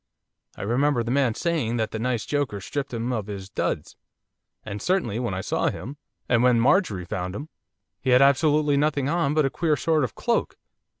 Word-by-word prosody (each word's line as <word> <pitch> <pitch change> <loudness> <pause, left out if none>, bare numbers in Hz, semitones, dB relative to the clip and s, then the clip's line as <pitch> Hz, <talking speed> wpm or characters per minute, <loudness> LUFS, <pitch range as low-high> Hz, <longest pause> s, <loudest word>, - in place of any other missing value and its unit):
I - - -5
remember 125 +4 +1
the 115 - -3
man 130 -4 +2
saying 150 -9 -1
that 110 -1 -1
that 110 - -4
nice 120 -1 -1
joker 145 -8 -1
stripped 140 +8 -4
him 120 +1 -2
of 110 -4 -3
his 100 -2 -7
duds, - - -3 0.7
and 105 -1 -5
certainly 175 - 0
when 120 -6 -2
I 95 - -2
saw - - 0
him, 140 +5 -7 0.3
and 120 -1 +3
when 125 -1 +4
Marjorie 115 - +2
found 90 +2 -4
him! 145 +6 -6 0.5
he 130 - -2
had 125 0 +6
absolutely 145 +1 +3
nothing 140 -2 +1
on 150 -2 +1
but 155 -2 +3
a 135 - 0
queer 160 -3 +1
sort 155 +3 +1
of 125 - -3
cloak. - - -1
125 Hz, 195 wpm, -25 LUFS, 110-145 Hz, 0.7 s, had